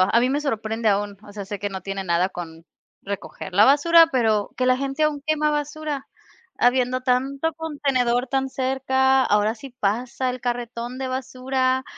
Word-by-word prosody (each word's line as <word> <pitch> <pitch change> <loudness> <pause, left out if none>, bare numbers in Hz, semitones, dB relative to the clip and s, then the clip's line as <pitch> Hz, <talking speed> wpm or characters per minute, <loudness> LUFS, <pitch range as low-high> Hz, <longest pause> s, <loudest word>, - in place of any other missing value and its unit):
a 190 +5 +4
mí 250 +2 +2
me 285 +2 0
sorprende 225 -4 -1
aún, 205 0 0
o 205 - -12
sea, 205 -1 -6
sé 200 0 -6
que 205 - -2
no 190 - -5
tiene 195 +1 -4
nada 180 0 +1
con 165 -2 -9 0.4
recoger 200 -1 -6
la 205 +2 +7
basura, 330 +5 +6
pero 220 -5 +1
que 255 - 0
la 255 0 +4
gente 275 +3 -1
aún 295 -2 -1
quema 305 -1 +1
basura. 295 -1 -3 0.5
Habiendo 250 +1 +2
tanto 270 +5 0
contenedor 265 -6 0
tan 270 0 0
cerca, 265 0 +2
ahora 210 +2 +2
sí 270 +4 -10
pasa 240 +5 -1
el 250 -1 -6
carretón 240 0 -4
de 265 0 -3
basura, 260 0 -1
255 Hz, 175 wpm, -23 LUFS, 215-270 Hz, 0.5 s, la